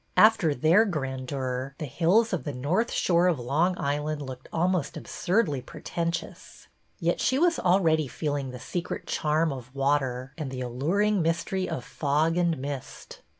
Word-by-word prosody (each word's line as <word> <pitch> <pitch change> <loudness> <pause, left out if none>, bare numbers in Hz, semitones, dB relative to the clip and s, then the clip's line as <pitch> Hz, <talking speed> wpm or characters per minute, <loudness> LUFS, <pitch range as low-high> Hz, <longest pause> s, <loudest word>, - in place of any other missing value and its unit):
After 205 -9 +5
their 165 - +5
grandeur, 130 - -3
the 155 - -4
hills 175 - +2
of 180 - -1
the 145 -3 -4
north 170 - 0
shore 175 0 +3
of 175 -4 +2
Long 160 +9 +1
Island 145 +1 -2
looked 130 -1 -9
almost 175 -1 0
ab - - -7
surdly 175 - 0
pretentious. 170 +5 -5 0.3
Yet - - 0
she 260 - +2
was 335 +2 +3
already 165 -5 +3
feeling 145 -1 -3
the 125 - -7
secret 175 +7 -4
charm 155 0 +1
of 130 0 -10
water 135 -2 0
and 150 -4 -3
the 130 -1 -5
alluring 175 - +1
mys 165 +1 0
tery 190 -1 -2
of 125 - -4
fog 150 +4 +1
and 170 -2 +1
mist. 140 0 -7
155 Hz, 160 wpm, -27 LUFS, 135-175 Hz, 0.3 s, After